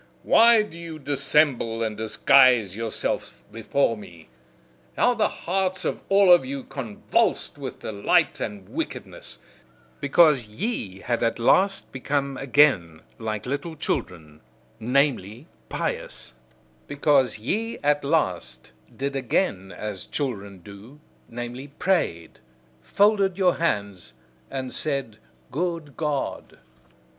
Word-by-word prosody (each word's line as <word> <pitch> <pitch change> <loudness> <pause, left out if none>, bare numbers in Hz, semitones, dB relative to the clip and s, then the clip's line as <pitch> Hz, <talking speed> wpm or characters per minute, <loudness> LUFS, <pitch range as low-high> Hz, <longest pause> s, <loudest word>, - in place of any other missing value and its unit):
Why 230 -1 +6
do 170 -5 -11
ye 165 -2 -7
dissemble 140 -5 +1
and 110 -1 -2
disguise 110 -1 +4
yourselves 115 0 -3
before 115 +2 0
me! 85 -8 -13 0.7
How 245 - +4
the 220 -3 +2
hearts 185 +1 -2
of - - -2
all 195 -2 +6
of 175 - +5
you 135 0 -5
convulsed 125 -7 -1
with - - -7
delight 100 -2 +1
and 100 -3 -5
wickedness, - - -6 0.6
because 140 -4 +4
ye 105 - -4
had 120 -1 -1
at 115 - +1
last 190 +11 +2
become 140 +1 -2
again 125 - +3 0.2
like 110 -2 -4
little 145 +5 -4
children 80 - -4 0.4
namely, 125 - 0 0.2
pious, - - -5 0.5
Because 140 -4 +2
ye 220 - -2
at 145 0 +2
last 140 - -1 0.3
did 140 +1 -3
again 115 - -1
as 105 -3 -6
children 100 - -5
do 105 +8 -13 0.3
namely, 120 +3 -6
prayed, 140 - -1 0.4
folded 200 - +2
your 185 -3 +2
hands 100 - -2 0.4
and 130 -2 -5
said 135 -8 -2 0.3
'good 165 -2 -3
God'! 150 -3 -3
135 Hz, 115 wpm, -24 LUFS, 110-155 Hz, 0.7 s, Why